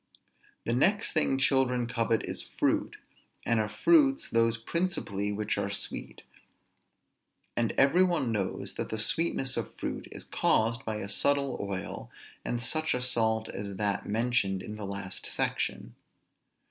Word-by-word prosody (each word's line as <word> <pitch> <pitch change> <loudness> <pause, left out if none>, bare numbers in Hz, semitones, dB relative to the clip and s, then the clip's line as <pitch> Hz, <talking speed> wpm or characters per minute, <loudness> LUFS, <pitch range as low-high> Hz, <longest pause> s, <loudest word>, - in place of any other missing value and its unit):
The 115 - 0
next 195 - +2
thing 150 -4 +2
children 130 -2 +2
covet 115 -2 0
is - - -3
fruit, - - -1 0.5
and 115 -1 +2
of 105 -1 -1
fruits 290 - +4
those 115 0 +3
principally 115 - -1
which 105 0 -1
are 100 0 -1
sweet; 100 - -6 1.3
and 115 -2 +1
every 140 +7 +4
one 170 -10 +1
knows 100 -4 -2
that - - -3
the 110 - -3
sweetness 135 +3 +2
of - - -4
fruit - - -4
is - - -7
caused 115 +3 +1
by 110 - -2
a 105 -2 -4
subtle 140 +5 +1
oil, 100 -2 -5 0.3
and 120 - -2
such 155 +6 +1
a 125 - -2
salt 110 -3 +1
as 100 0 -5
that 100 0 -1
mentioned 110 -4 +1
in 105 - -6
the 105 -1 -6
last 100 -1 -5
section. - - -2
115 Hz, 145 wpm, -29 LUFS, 105-135 Hz, 1.3 s, fruits